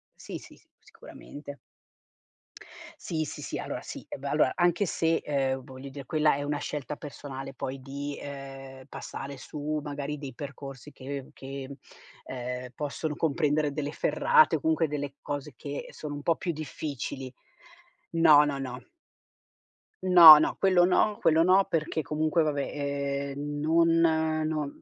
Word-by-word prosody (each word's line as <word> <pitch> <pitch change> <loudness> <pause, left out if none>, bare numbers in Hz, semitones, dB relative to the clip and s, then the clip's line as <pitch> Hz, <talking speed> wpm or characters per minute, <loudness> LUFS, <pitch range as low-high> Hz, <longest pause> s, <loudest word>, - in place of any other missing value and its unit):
sì, - - -7
sì, - - -15
s - - -27
sicuramente. 145 -1 -11 1.4
Sì, 155 -2 -2
sì, - - -7
sì, - - -4
allora, - - -5
sì. - - -8
Eh, - - -5
beh - - -6
allora, - - +3
anche 175 +3 +2
se, 165 -2 +1
ehm, 135 -2 -1
voglio 130 +1 -10
dire, 135 -1 -9
quella 155 0 +2
è 145 - -3
una 145 0 -1
scelta 150 0 -4
personale 135 -2 -8
poi 130 +1 -5
di, 140 +2 -5
ehm, 135 -1 -9
passare 140 +1 -7
su, 150 +3 -4
magari, 145 0 -4
dei 140 -3 -7
percorsi 140 +1 -8
che 135 0 -7
che, 135 0 -7
mhmm, 140 - -8 0.6
ehm, 125 0 -5
possono 150 +1 -3
comprendere 150 -1 +1
delle 145 -1 -3
ferrate 470 - +4
o - - -1
comunque 320 - +2
delle 145 -1 -4
cose 145 0 -5
che 145 -1 -6
sono 145 -1 -7
un 145 - -6
po' 165 - +3
più 180 +1 -3
difficili 140 -4 -5 0.8
no, 160 -3 +7
no, 145 -1 -2
no. 125 -1 -5 1.2
No, 170 -4 +11
no, 155 - +1
quello 185 -2 +5
no, 205 +3 +3
quello 160 +1 +4
no 190 +2 +5
perché 160 0 -1
comunque, 155 +3 +1
va 155 -1 +2
beh, 140 -1 -2
ehm, 145 +1 -4
non 165 +2 +3 0.6
no 150 -2 -3
145 Hz, 155 wpm, -28 LUFS, 140-155 Hz, 1.4 s, No